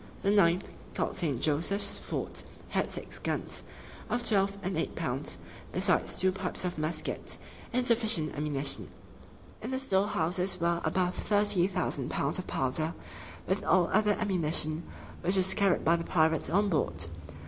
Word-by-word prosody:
The 200 - +2
ninth, 185 -3 +3 0.3
called - - -2
St. 150 -9 -1
Joseph's 160 +8 +1
Fort, - - -4 0.3
had - - -1
six - - -5
guns, - - -3 0.5
of 240 0 -1
twelve 200 -2 +1
and 190 +1 -2
eight - - -2
pounds, - - -1 0.3
besides - - +1
two 185 0 +2
pipes 185 -1 -2
of 175 -3 -3
muskets, 155 +2 -3 0.3
and 250 +1 0
sufficient 220 -10 +6
ammunition. 145 -2 0 0.7
In 225 - -5
the 260 - -2
storehouses 190 -6 0
were 170 0 0
above 180 +3 0
thirty 205 -3 +1
thousand 180 -8 -2
pounds 140 +5 0
of 185 - -6
powder, 155 +5 -1 0.5
with 190 +1 -1
all 180 -2 +2
other 210 0 +3
ammunition, 165 -6 +3 0.4
which 185 +3 0
was 190 0 +8
carried 195 -2 +1
by 165 - +4
the 165 - -4
pirates 160 -4 +1
on 200 +5 +2
board. 85 - 0
180 Hz, 150 wpm, -29 LUFS, 160-200 Hz, 0.7 s, was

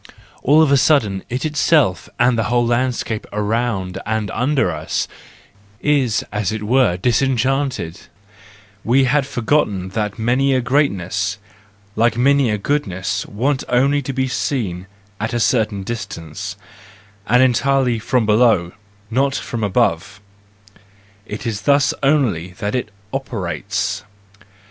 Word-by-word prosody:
All 150 +4 +5
of 150 - +2
a 140 - +6
sudden, 125 -9 +2
it 125 +5 -3
itself, 150 - +2
and 120 0 +4
the 115 - 0
whole 120 0 +2
landscape 120 -2 -1
around 105 -3 -1
and 110 -1 -2
under 130 +4 +1
us, - - -2 0.7
is 135 -7 +1
as 105 -2 -1
it 110 -1 -4
were 120 -5 +2
disenchanted; 125 - 0 0.8
we 130 +4 +3
had 135 +1 +2
forgotten 110 -8 0
that 105 0 -3
many 130 +4 +2
a 130 - +2
great¬ 140 +4 +3
ness, 95 +2 -3 0.6
like 115 +1 +2
many 140 0 +3
a 105 - 0
goodness, 100 -6 -2
wants 130 +6 -1
only 140 +4 +3
to 135 - -4
be 130 0 -1
seen 105 -8 -2 0.3
at 110 +3 -2
a - - +1
certain 110 -4 +1
distance, 100 -3 -6 0.7
and 125 +3 +5
entirely 130 -1 +2
from 115 +1 +1
below, 105 -5 +3 0.4
not 135 +3 +1
from 115 -4 -4
above,—it 100 -3 0 1.3
is 110 -4 -2
thus 140 +2 +3
only 120 - +1
that 100 +3 -4
it 125 -4 -2 0.2
operates 100 -4 -3
120 Hz, 130 wpm, -19 LUFS, 105-135 Hz, 1.3 s, a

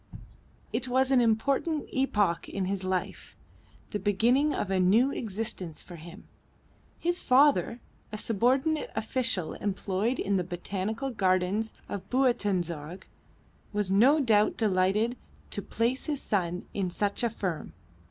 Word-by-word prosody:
It 260 - -2
was 260 +1 +2
an 260 -2 +5
important 275 +7 +1
epoch 210 -10 +1
in 195 -2 -2
his 195 0 -2
life, 185 +1 -3 0.6
the 210 - -2
beginning 235 +9 +2
of 195 - -2
a 190 - +2
new 220 +9 +4
existence 200 - -4
for 175 - -11
him. 170 +5 -12 0.7
His 350 +1 0
father, 260 -2 +3 0.3
a 215 - -4
subordinate 260 +9 +1
official 220 -5 -1
employed 205 +4 -1
in 200 0 0
the 180 - 0
Botanical 195 +8 -3
Gardens 195 +1 +1 0.2
of 195 -2 -6
Buitenzorg, 185 - 0 0.7
was 205 -2 0
no 255 +10 +5
doubt 215 -6 +3
delighted 210 +3 +1 0.3
to - - -1
place 240 +3 -1
his 295 -3 -1
son 180 -6 -1
in 190 -3 -1
such 200 +3 -1
a 235 - +2
firm. 185 -7 -4
210 Hz, 135 wpm, -28 LUFS, 185-250 Hz, 0.7 s, an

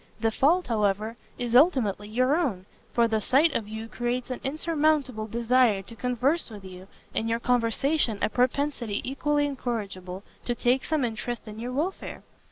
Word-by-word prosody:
The 225 0 +1
fault, 330 +10 +3
however, 215 0 0 0.2
is 240 -1 -2
ultimately 245 - +4
your 255 +6 +2
own, 230 - -1 0.3
for 235 -1 +3
the 220 -1 0
sight 280 +8 +4
of 215 - -2
you 220 +1 -6
creates 240 +2 -2
an 250 - -4
insurmountable 295 -5 0
desire 235 -2 +2
to 230 - -11
converse 250 +7 0
with 205 -3 -10
you, 185 0 -10 0.3
and 225 - -1
your 230 0 +1
conversation 245 +1 +1
a - - +4
propensity 250 -3 0
equally 290 +2 +1
incorrigible 200 -9 -4 0.2
to 240 - -1
take 250 +2 +1
some 310 -5 +1
interest 235 +1 -4
in 215 +1 -8
your 245 +2 -4
welfare." 315 +9 -3
240 Hz, 165 wpm, -27 LUFS, 220-275 Hz, 0.3 s, ultimately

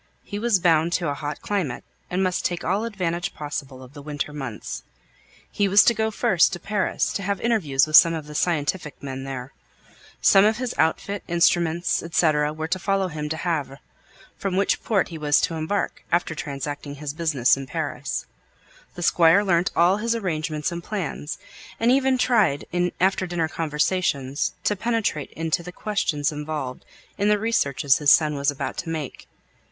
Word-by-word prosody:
He 205 - -5
was 230 -2 +3
bound 165 -1 +3
to 170 -4 0
a - - -1
hot 145 +1 -5
climate, 180 -12 -2 0.3
and 185 +1 0
must 185 -1 0
take 175 -1 -2
all 195 +6 0
advantage 180 -4 -3
possible 140 -3 -6
of 130 +1 -14
the 145 - -10
winter 145 0 -4
months. 135 -7 -6 0.7
He 205 - +1
was 200 +2 +7
to 235 - +4
go 220 0 0
first 180 -5 +3
to 175 - -4
Paris, 205 -1 -1
to - - -2
have 200 0 -2
interviews 165 - +2
with 155 0 0
some 165 0 +8
of 155 -2 -5
the 150 - -10
scientific 150 -2 -1
men 135 -1 -5
there. 135 -1 -6 0.7
Some 195 - +6
of 215 +1 +3
his 250 -1 -3
outfit, 200 +5 0
instruments, 170 0 +2
&c., 155 0 +4
were 150 +1 -1
to 185 +3 -1
follow 195 0 0
him 150 -2 -5
to 160 - -2
Havre, 155 -6 -2 0.6
from 195 -2 -2
which 195 - +1
port 200 -5 +1
he 165 -2 -7
was 145 -1 +3
to - - 0
embark, 160 +6 -2
after 170 -1 +1
transacting 145 -1 -5
his 145 0 -5
business 155 -6 +2
in 135 -1 -7
Paris. - - -3 0.7
The 175 - -5
Squire 170 +4 +5
learnt 175 -3 +2
all 175 +3 +4
his 230 +2 0
arrangements 160 -6 -2
and 170 0 -5
plans, 175 -7 -4 0.4
and 230 +2 +3
even 265 0 +3
tried 220 - +2
in 180 0 0
after 185 0 +2
dinner 170 -2 -1
conversations 150 -3 -1
to 210 - +1
penetrate 220 -8 -1
into 165 +1 -1
the 180 +1 -8
questions 160 -8 -1
involved 150 -4 -5 0.3
in 205 +1 +2
the 210 - +4
researches 145 - +1
his 145 -2 +3
son 155 +1 +5
was 140 0 0
about 145 - -4
to 170 - -4
make. 155 -4 -5
165 Hz, 180 wpm, -24 LUFS, 150-195 Hz, 0.7 s, some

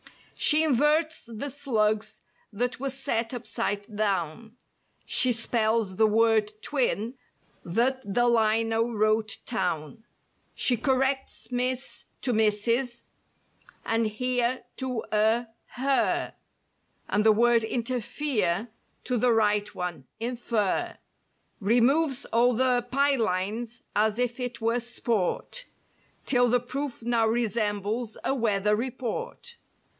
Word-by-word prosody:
She 310 +1 +4
inverts 305 +2 +2
the 235 +5 -5
"slugs" 220 -6 -1 0.3
that 245 +4 -2
were 275 +1 -2
set 255 -4 -2
upside 215 -3 -3
down; 210 +2 -2 0.5
She 255 - +3
spells 225 -4 +1
the 220 - +5
word 220 -1 +3
"twin" 245 -5 0 0.5
that 245 +9 +1
the 240 +4 +3
lino 225 0 +2
wrote 215 0 +1
"town;" 185 -1 -3 0.5
She 250 - +2
corrects 265 +2 -1
"Miss" 250 +1 -2 0.2
to 250 - +1
"Mrs." 230 +3 +1 0.8
and 225 0 +1
"here" 245 +3 0
to 255 -4 -3
a 220 +3 +3 0.3
"her;" 270 +2 +1 0.7
And 210 - +1
the 220 - +6
word 235 +1 +4
"interfere" 235 - -1 0.3
to 250 - -1
the 245 +2 +3
right 210 -2 +2
one 175 -7 -4
"infer;" 235 - -1 0.6
Removes 255 +7 +2
all 240 +1 +3
the 250 0 +2
"pie 280 +2 +3
lines" 220 +3 -2
as 215 +1 +2
if 245 0 -1
it 245 -1 -4
were 230 +2 +1
sport— 240 - -2 0.6
'Till 245 -2 +3
the 245 +1 +3
proof 260 0 -5
now 230 -1 +2
resembles 220 0 -1
a - - +1
weather 210 -4 +1
report. 260 - -4
235 Hz, 110 wpm, -27 LUFS, 215-250 Hz, 0.8 s, the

